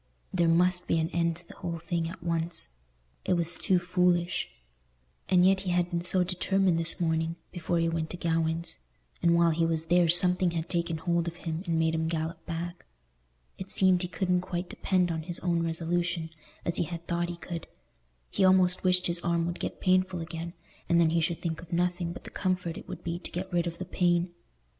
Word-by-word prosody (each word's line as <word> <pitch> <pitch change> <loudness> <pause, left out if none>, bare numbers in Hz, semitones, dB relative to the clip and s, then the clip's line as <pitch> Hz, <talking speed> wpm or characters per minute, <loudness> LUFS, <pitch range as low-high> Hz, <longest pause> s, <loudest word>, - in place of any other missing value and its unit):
There 170 -2 +2
must 180 +2 +3
be - - +2
an 160 +2 0
end 170 -1 +1
to 170 +1 -12
the - - -13
whole 170 -1 -4
thing 165 0 -2
at 170 0 -10
once. 165 - -2 0.5
It - - +1
was 170 -1 0
too 190 -3 +2
foolish. 180 0 +1 0.8
And 180 -1 +5
yet 190 0 +4
he 190 -1 -4
had 175 0 +1
been 170 -1 -1
so 180 +1 +4
determined 185 0 +1
this 165 +3 +2
morning, 160 -1 0 0.2
before 175 -1 -2
he 165 0 +2
went 165 -1 -2
to 180 - -2
Gawaine's; 165 -1 0 0.4
and 170 0 +4
while 170 0 +4
he 165 +1 +1
was 165 -1 0
there 175 0 +3
something 180 +1 +5
had 165 -1 -3
taken 170 -2 -1
hold 170 +1 0
of 170 - -4
him 160 0 -2
and 165 -1 +1
made 160 0 +2
him 160 0 0
gallop 165 +1 -3
back. 170 +1 -5 0.7
It 190 0 -6
seemed 185 -2 +4
he 180 - -1
couldn't 180 +1 0
quite 180 -1 -4
depend 180 -2 +1
on 160 -1 -2
his 170 +1 -3
own 170 -2 +1
resolution, 165 0 -1 0.3
as 170 - 0
he 175 - +1
had 170 +1 -7
thought 175 0 -1
he 175 - -5
could; 170 -1 -6 0.6
he - - +1
almost 185 -1 +4
wished 180 -1 +3
his 170 0 0
arm 170 -1 0
would 175 +1 -4
get - - -4
painful 185 -1 +2
again, 165 +1 -6 0.4
and 170 - +4
then 165 -2 +4
he 165 0 +2
should 165 +1 -2
think 165 -2 -2
of 170 0 -14
nothing 175 0 0
but 175 - -9
the - - -10
comfort 180 -3 -1
it - - -10
would - - -8
be 170 0 -3
to - - -8
get 185 +1 -5
rid 175 0 +1
of 170 - -5
the 185 - -5
pain. 175 -1 +1
170 Hz, 215 wpm, -29 LUFS, 165-180 Hz, 0.8 s, And